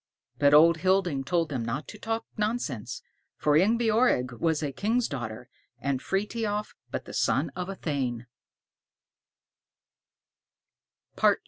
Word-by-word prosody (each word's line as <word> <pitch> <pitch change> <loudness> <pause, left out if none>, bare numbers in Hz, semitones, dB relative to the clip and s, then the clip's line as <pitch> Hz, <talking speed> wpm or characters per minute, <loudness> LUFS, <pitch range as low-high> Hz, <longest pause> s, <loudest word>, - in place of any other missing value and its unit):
But 145 0 +6
Old 165 +2 +7
Hilding 180 -6 +1
told 165 +2 +1
them 130 -5 -2
not 115 +6 -3
to 210 - -10
talk 225 +1 -2
nonsense, 210 - -2 0.3
for 150 -1 +2
Ingebjorg 220 - +3
was 160 -2 +1
a 145 - -1
king's 220 - 0
daughter, 120 -3 -6 0.3
and 130 +1 -2
Frithiof 210 +1 -2 0.2
but - - -4
the - - -9
son - - +1
of 180 0 -4
a 195 - -4
thane. 130 -8 -2
165 Hz, 120 wpm, -28 LUFS, 135-210 Hz, 0.3 s, Old